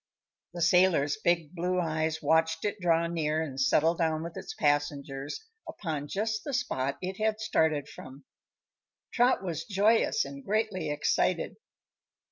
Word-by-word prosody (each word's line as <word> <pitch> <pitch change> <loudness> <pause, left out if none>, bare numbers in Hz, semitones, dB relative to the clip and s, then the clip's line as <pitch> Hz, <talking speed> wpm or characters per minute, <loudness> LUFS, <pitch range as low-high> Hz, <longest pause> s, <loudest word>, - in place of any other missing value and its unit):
The 175 - -1
sailor's 170 -4 +4
big 170 -6 0
blue 180 +1 -1
eyes 160 -1 -1
watched 160 +1 +2
it 205 0 -2
draw 170 -2 +2
near 160 -2 -1
and 135 -3 -4
settle 155 +5 +3
down 160 -2 0
with 170 0 -7
its - - -7
passengers 145 - -1 0.2
upon 155 -6 -4
just 215 +6 -2
the 285 -4 -3
spot 140 - -1
it 185 +1 -4
had 215 0 0
started 160 -9 +1
from. 135 0 -12 0.9
Trot 245 -4 +3
was 170 -5 -3
joyous 225 - +2
and 280 -1 -9
greatly 205 - -1
excited. 145 - 0
165 Hz, 140 wpm, -29 LUFS, 150-200 Hz, 0.9 s, sailor's